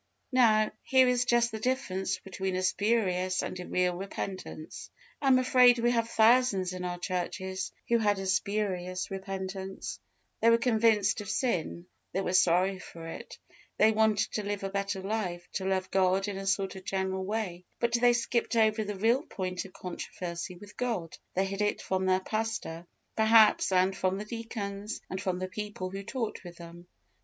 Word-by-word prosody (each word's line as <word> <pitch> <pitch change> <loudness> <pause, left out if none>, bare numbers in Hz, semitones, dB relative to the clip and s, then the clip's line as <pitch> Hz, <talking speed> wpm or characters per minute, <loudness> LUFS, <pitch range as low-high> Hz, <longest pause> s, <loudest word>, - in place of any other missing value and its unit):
Now, 220 -4 +4
here 260 -1 +4
is 250 0 +2
just 240 -1 +3
the 220 - -5
difference 200 -6 -1
between 190 0 -4
a 185 - -1
spurious 185 -3 +1
and 185 - -5
a 180 - -6
real 180 -1 +1
repentance. 190 -3 -6 0.3
I 280 - 0
am 260 -1 +6
afraid 250 -1 +6
we 240 +1 +2
have 230 -1 0
thousands 220 -5 +4
in 180 0 -5
our 180 0 -3
churches 185 +1 -3 0.2
who 235 0 +3
had 205 -2 +2
a 195 - -4
spurious 190 -2 -1
repentance: 190 0 -5 0.4
they 230 - +5
were 230 - +6
convinced 220 -3 +2
of 205 - -8
sin 190 -6 -1 0.3
they 195 - 0
were 185 - -2
sorry 185 +1 +3
for 165 -2 -10
it; 165 - -8 0.4
they 215 +1 +5
wanted 220 -1 +2
to 215 - -2
live 205 -1 -3
a 195 - -3
better 195 -1 -2
life, 190 -4 -3
to 190 - -3
love 190 -1 -1
God 190 +1 +2
in 200 -2 -4
a 195 - -5
sort 195 -1 0
of 190 - -9
general 190 0 -2
way; 190 -3 -3
but 235 0 0
they 240 0 +5
skipped 235 0 0
over 220 -1 +3
the 210 0 -4
real 230 +6 +3
point 185 - -4
of 190 - -12
controversy 180 0 -6
with 205 +3 -14
God; 225 -10 -2 0.2
they 190 +1 +2
hid 195 +1 -4
it 210 - +1
from 190 0 -1
their 185 0 +3
pastor, 215 -6 -3 0.3
perhaps, 220 -2 +5
and 185 +1 +3
from 185 0 0
the 210 - -5
deacons, 210 -2 -5
and 190 0 -3
from 185 -1 -1
the 185 0 -3
people 195 -1 -5
who 195 +1 -5
talked 225 +1 -4
with 175 -2 -10
them. 170 0 -11
195 Hz, 185 wpm, -29 LUFS, 185-220 Hz, 0.4 s, am